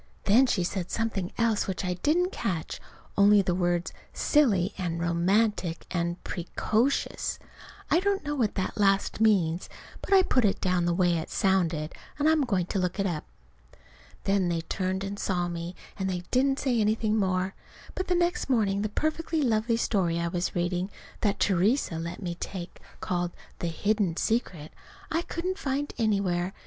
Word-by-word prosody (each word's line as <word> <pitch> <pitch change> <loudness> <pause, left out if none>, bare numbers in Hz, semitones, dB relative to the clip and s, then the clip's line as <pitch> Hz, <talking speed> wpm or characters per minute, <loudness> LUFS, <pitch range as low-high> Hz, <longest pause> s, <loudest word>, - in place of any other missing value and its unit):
Then 240 +6 +5
she 185 -7 +1
said 180 0 -3
something 215 -5 -2
else 230 -3 +1
which 190 0 -3
I 180 - 0
didn't 330 - +1
catch, 170 - -3 0.3
only 200 0 +6
the 180 - 0
words 175 -1 0 0.2
"silly" 210 - +3
and 170 -3 -3
"romantic," 175 +1 +1
and 170 -1 -1
"pre 175 -1 -5
co 220 +3 +2
shus." 280 - -1 0.5
(I 335 - +5
don't 395 -1 0
know 295 - -1
what 240 -7 0
that 190 +2 -2
last 195 +1 +2
means, 185 -6 +2 0.3
but - - -8
I 385 -1 +7
put 255 -8 +2
it 200 -2 +2
down 180 -2 +1
the 175 - +2
way 175 -2 +2
it 160 - -6
sounded, 175 -6 +1 0.2
and 295 +1 +2
I'm 315 -3 +4
going 195 -7 0
to 195 - +1
look 180 +1 -1
it 195 - +1
up.) 170 -5 -2 1.0
Then 195 -2 +2
they 170 -1 0
turned 185 +3 -2
and 200 +1 -5
saw 175 -2 0
me, 170 +1 -5 0.2
and 190 0 0
they 180 -1 -3
didn't 270 +2 +3
say 245 -5 +1
anything 215 0 +1
more. 190 -1 0 0.4
But 370 - -3
the 360 - +2
next 345 -4 0
morning 205 -6 +2
the 215 - -1
perfectly 315 +5 -1
lovely 230 -1 +2
story 180 -7 +1
I 170 0 -1
was 175 0 -2
reading, 175 +2 -1 0.3
that 200 -2 0
Theresa 195 - +2
let 170 +4 -5
me 175 -1 -2
take, 180 -2 -6 0.2
called 175 -1 -1 0.3
"The 170 - -2
Hidden 190 +1 0
Secret," 180 -9 -1 0.4
I 325 +1 +1
couldn't 365 +3 -4
find 285 -2 -2
anywhere. 195 -4 +1
195 Hz, 175 wpm, -28 LUFS, 175-230 Hz, 1.0 s, I